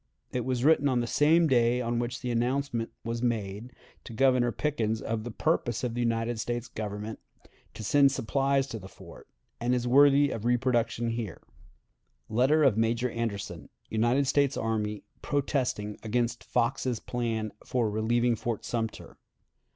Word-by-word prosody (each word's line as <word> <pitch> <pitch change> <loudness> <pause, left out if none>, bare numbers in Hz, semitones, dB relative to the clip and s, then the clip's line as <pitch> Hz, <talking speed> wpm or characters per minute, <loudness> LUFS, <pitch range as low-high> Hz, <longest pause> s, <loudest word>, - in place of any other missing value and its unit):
It 125 -2 -2
was 125 -1 -1
written 145 -1 +4
on 125 -2 +2
the 120 - 0
same 160 +7 +4
day 120 -2 +3
on 120 -1 -1
which 120 +1 -3
the 125 - -2
announcement 120 0 -1
was 115 0 -3
made 110 -1 -2 0.3
to - - -9
Governor 125 0 +3
Pickens 115 -5 -1
of 110 -1 -3
the 120 - -5
purpose 120 -2 -1
of 120 -2 -1
the 120 - -4
United 115 0 0
States 120 +1 -3
Government 105 0 -5 0.6
to - - -7
send 140 +4 +4
supplies 135 +2 +1
to 115 - -5
the 95 - -10
fort, - - -14 0.3
and 120 +1 +1
is 125 0 -1
worthy 140 +2 +5
of 110 - -4
reproduction 120 -1 +1
here: 115 -6 -5 0.9
[Letter 135 +8 +3
of 120 -6 +4
Major 115 +2 +1
Anderson, 105 -7 -4 0.2
United 120 +5 +2
States 140 0 +2
Army, 105 -2 -2 0.2
protesting 130 -7 -1
against 120 +1 -1
Fox's 125 0 0
Plan 115 -3 -2
for 120 -3 0
relieving 115 +3 +1
Fort 115 0 -4
Sumter. 115 -2 -4
120 Hz, 155 wpm, -28 LUFS, 110-130 Hz, 0.9 s, worthy